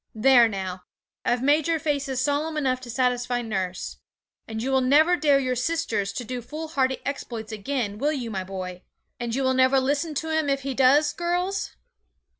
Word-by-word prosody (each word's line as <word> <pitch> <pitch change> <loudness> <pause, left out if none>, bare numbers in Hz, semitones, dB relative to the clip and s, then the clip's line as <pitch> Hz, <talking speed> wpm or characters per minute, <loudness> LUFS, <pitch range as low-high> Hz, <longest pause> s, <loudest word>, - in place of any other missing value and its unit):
There 240 +1 +6
now! 190 -3 -4 0.4
I've 245 +1 0
made 290 +3 +3
your 330 -1 +2
faces 285 -4 -1
solemn 295 +3 0
enough 260 -3 0
to 250 - -10
satisfy 245 0 0
nurse. 190 -5 -3 0.5
And 220 0 -4
you 265 - -1
will 265 0 +3
never 305 +7 +5
dare 295 -4 +3
your 255 -2 0
sisters 250 -7 -1
to 250 - -4
do 250 +1 -5
foolhardy 280 -1 -2
exploits 235 -5 -5
again, 215 -1 -3
will 290 +4 +1
you, 245 -6 -4
my 190 -2 -3
boy? 185 -1 -6 0.4
And 240 -1 -2
you 270 - 0
will 260 0 +2
never 260 +1 +4
listen 285 +4 -1
to 320 +2 -1
him 315 -2 +1
if 275 0 +1
he 275 0 -3
does, 275 +4 +4
girls? 355 +3 -2
260 Hz, 185 wpm, -25 LUFS, 235-295 Hz, 0.5 s, There